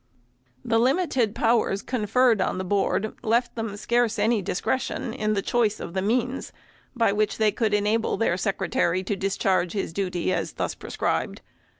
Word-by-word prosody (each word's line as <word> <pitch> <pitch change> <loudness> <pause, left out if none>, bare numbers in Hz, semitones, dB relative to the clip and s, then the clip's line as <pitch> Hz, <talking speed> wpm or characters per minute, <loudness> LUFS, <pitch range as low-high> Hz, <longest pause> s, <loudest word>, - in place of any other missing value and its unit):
The 225 -1 +2
limited 255 - +1
powers 225 -4 +1
conferred 235 -1 +2
on - - 0
the 185 - -2
Board 200 +2 0
left 235 +2 +1
them 225 -3 -4
scarce 235 +2 +1
any 215 +1 +2
discretion 225 +5 -2
in 215 -4 -1
the 195 -2 -1
choice 225 -3 +1
of - - -7
the 190 - -1
means, 245 +5 -1 0.4
by 230 -4 +2
which 210 0 0
they 215 -1 +3
could 220 -2 0
enable 210 +2 +1
their 225 -6 +1
Secretary 185 -1 0
to 200 +2 -2
discharge 190 -2 0
his 195 -5 -3
duty 180 -1 -1
as - - -2
thus - - -2
prescribed. - - -3
215 Hz, 165 wpm, -25 LUFS, 195-235 Hz, 0.4 s, they